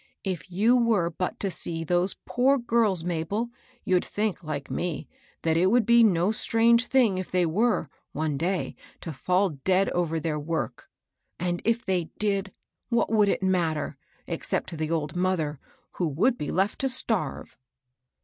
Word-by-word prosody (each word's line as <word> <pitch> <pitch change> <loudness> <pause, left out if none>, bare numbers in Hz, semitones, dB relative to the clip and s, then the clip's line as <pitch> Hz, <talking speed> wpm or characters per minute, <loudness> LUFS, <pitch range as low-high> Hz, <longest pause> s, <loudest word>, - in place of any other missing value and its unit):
If 185 -6 -4
you 215 +7 +4
were 220 -8 +2
but 180 +2 -3
to 195 - -1
see 165 -1 -3
those 175 +3 +1
poor 265 +3 +3
girls, 225 -7 +1
Mabel, 180 +7 -2 0.3
you'd 185 -1 +2
think, 210 -3 -2
like 145 -3 -5
me, 170 -4 -3 0.4
that 160 0 +2
it 180 +2 +4
would 230 +2 +3
be 235 +1 +6
no 185 -2 +3
strange 230 +2 +3
thing 235 -9 +3
if 185 - -5
they 180 -1 +2
were, 205 +2 +1 0.2
one 155 0 -2
day, 175 +6 -1 0.3
to 165 - -5
fall 185 +7 +1
dead 190 +1 +3
over 165 -2 0
their 155 -1 -2
work. 150 -4 -4 0.5
And 175 0 -1
if 230 +1 +1
they 180 -3 0
did, 200 -2 0 0.4
what 235 -2 +1
would 210 -2 +4
it - - 0
matter, 170 -5 0 0.3
except - - -2
to - - -6
the 155 -1 -2
old 155 -2 -2
mother, 175 -5 0 0.4
who 175 - +1
would 200 - +2
be 150 - -4
left 195 +3 0
to 270 - 0
starve? 220 - -2
185 Hz, 170 wpm, -26 LUFS, 165-220 Hz, 0.5 s, be